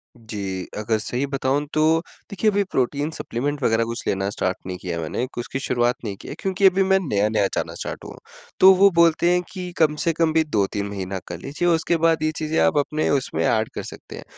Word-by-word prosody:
जी, 100 -5 -5
अगर 110 +1 0
सही 125 +5 -1
बताऊँ 140 +1 0
तो 155 - +2 0.5
देखिए 200 +1 +1
अभी 200 0 +2
प्रोटीन 140 +4 0
सप्लीमेंट 145 0 -3
वग़ैरह 115 -1 +3
कुछ 115 +1 -5
लेना 95 0 0
स्टार्ट 95 -2 -2
नहीं 90 -1 -4
किया 85 -2 -3
मैंने, 80 +9 -3
एक 130 - -7
उसकी 120 +2 -3
शुरुआत 120 -2 +1
नहीं 105 -3 -4
की - - -11
है - - -6
क्योंकि 195 +1 0
अभी 190 +1 +5
मैं 190 0 +3
नया-नया 105 - +1
जाना - - -2
स्टार्ट - - -6
हुआ - - -8
हूँ, - - -14 0.4
तो 190 - +9
वो 195 +2 +6
बोलते 170 +1 +4
हैं 180 0 +3
कि 180 -2 -6
कम 155 -2 +3
से 165 - +2
कम 160 0 +1
भी 160 0 +4
2-3 105 -7 -1
महीना 95 -1 -4
कर 85 - -6
लीजिए, 145 - -2
उसके 165 0 +2
बाद 165 -1 +2
ये 155 - +2
चीजें 155 +1 -1
आप - - +3
अपने 150 +2 0
उसमें 140 -2 0
एड 110 -1 +1
कर - - -4
सकते - - -10
हैं, - - -9
140 Hz, 225 wpm, -22 LUFS, 110-165 Hz, 0.5 s, तो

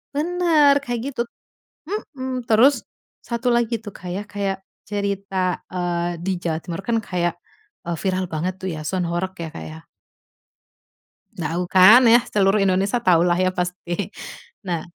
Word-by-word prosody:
Bener, 320 -2 +4
kayak 240 -3 -3
gitu 245 - -2 0.7
mhm. 260 - -4
Terus 235 +6 +6 0.5
satu 235 +1 -2
lagi 235 -1 +1
tuh, 205 -3 -8
Kak, 180 - -9
ya, 200 - -3
kayak 200 -1 -1 0.3
cerita, 200 -1 -3 0.4
eee, 175 -1 -1
di 195 - -1
Jawa 165 -2 -1
Timur 170 +1 -5
kan 235 - +2
kayak, 175 -2 0 0.5
eee, 170 0 -2
viral 185 -1 0
banget 165 +4 -1
tuh 190 - -3
ya, 155 - -5
Soud 180 +2 -1
Horeg 175 +2 -2
ya, - - -5
Kak, 80 - -7
ya. 80 - -9 1.6
Tau 170 +2 -2
kan 210 +8 +8
ya, 235 +1 +6
seluruh 200 0 +3
Indonesia 195 +5 +1
tau 175 -3 +5
lah 175 -1 +3
ya 185 +1 +2
pasti. 180 +1 -3 0.6
Nah 175 -4 -3
190 Hz, 150 wpm, -22 LUFS, 175-235 Hz, 1.6 s, kan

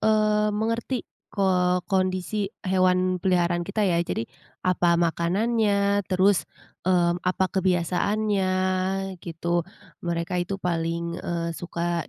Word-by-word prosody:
mmm, 210 -1 +2
mengerti 230 +3 -1 0.2
ko 180 -2 +1
kondisi 190 +1 0 0.2
hewan 185 -1 +2
peliharaan 175 -2 +2
kita 200 +4 -1
ya. 175 -3 +2
Jadi, 145 -9 -2 0.4
apa 175 -2 +3
makanannya, 200 +4 +1
terus, 190 +1 +3 0.4
mmm, 175 -1 +3
apa 180 +1 +1 0.2
kebiasaannya, 190 +2 +1 0.7
gitu. 170 +1 -2 0.3
Mereka 170 +1 -2
itu 195 - -2
paling, 170 -1 -2
eee, 170 -1 -2
suka 170 0 -3
185 Hz, 105 wpm, -25 LUFS, 170-200 Hz, 0.7 s, apa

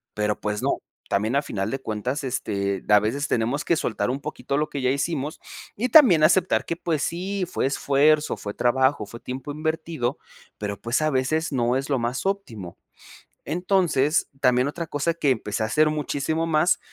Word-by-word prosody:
Pero, 105 0 -1
pues, 105 0 -2
no, - - +1 0.3
también 110 +5 0
a - - +3
final 95 -8 -3
de 135 - -2
cuentas 125 +4 -3
este, 100 -6 -2
a 105 0 +7
veces 135 +8 -1
tenemos 120 +6 0
que 170 - +3
soltar 120 -4 -1
un 130 +2 -2
poquito 140 - -3
lo 150 +1 0
que 140 - -4
ya 130 - +2
hicimos 145 +2 -2 0.4
y 235 +5 0
también 220 - +7
aceptar 185 +3 +3
que, 170 - -2
pues, 165 -4 -1
sí 185 +3 -2
fue 160 - 0
esfuerzo, 145 +2 +2
fue 105 - -6
trabajo, 130 0 +2
fue 115 +4 -10
tiempo 130 +3 -6
invertido, 155 -4 -2 0.4
pero, 100 -1 -5
pues, 120 +5 0
a 155 - +2
veces 155 +5 0
no 125 0 +1
es 135 +1 -4
lo 135 -3 +1
más 120 +6 -2
óptimo. 120 - -4 0.7
Entonces, 170 -4 +1
también 125 0 +3
otra 170 +3 -5
cosa 145 +3 -1
que 150 -4 +1
empecé 110 -3 -1
a - - +1
hacer 155 +7 +3
muchísimo 155 +2 -1
más; 160 +2 +3
140 Hz, 185 wpm, -24 LUFS, 120-155 Hz, 0.7 s, a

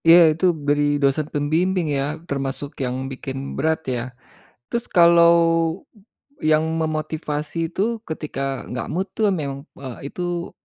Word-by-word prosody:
Iya, 165 +1 +10 0.2
itu 160 +4 -1 0.2
beri 145 0 +3 0.2
dosen 140 +2 +2
pembimbing 165 +5 +1
ya, - - +1 0.3
termasuk 140 +1 -3
yang 125 0 -1 0.2
bikin 135 0 -6 0.2
berat 160 +3 +1
ya, 120 - -1 0.7
terus 235 - -2
kalau 170 -1 +7 1.2
yang 155 0 +4 0.2
memotivasi 155 -1 -3
itu 190 - -1 0.3
ketika 155 -3 -5 0.3
enggak 125 -1 -4
mood 185 +3 -1
tu - - -6 0.2
memang, 140 -2 -4 0.2
eee, 135 +1 -7
itu 175 -1 -3
155 Hz, 130 wpm, -22 LUFS, 140-170 Hz, 1.2 s, Iya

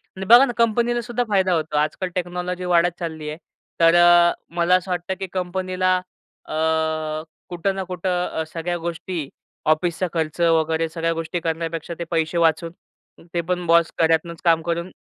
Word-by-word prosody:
आणि 190 0 -5
बघा 240 +6 +8
ना 245 - -4
कंपनीलासुद्धा 235 +1 +1
फायदा 190 -3 +2
होतो 155 -2 -1
आजकाल 155 +5 -1
टेक्नॉलॉजी 180 0 -3
वाढत 175 0 +3
चालली 160 -3 -5
आहे. 150 - -6 0.4
तर 165 0 +5
अ, 175 0 +6 0.2
मला 175 +1 +3
असं 185 0 -1
वाटतं, 180 +1 -2
की 190 - -4
कंपनीला 185 0 0 0.5
अ, - - -7 1.0
कुठं 180 +2 -1
ना 190 - -3
कुठं 180 0 -2
अ, 160 - -3
सगळ्या 175 +1 -2
गोष्टी 170 -1 -4 0.4
ऑफिसचा 170 +3 +1
खर्च 160 -1 -2
वगैरे 165 -1 +2
सगळ्या 165 0 -1
गोष्टी 165 +1 -3
करण्यापेक्षा 165 0 -3
ते - - -2
पैसे 165 0 0
वाचून 165 0 +2 0.6
ते 170 - 0
पण 180 -1 -1
बॉस 170 0 +4
घरातनाच 165 +1 +1
काम 165 -1 +4
करून 170 +2 -3
175 Hz, 160 wpm, -22 LUFS, 165-185 Hz, 1.0 s, बघा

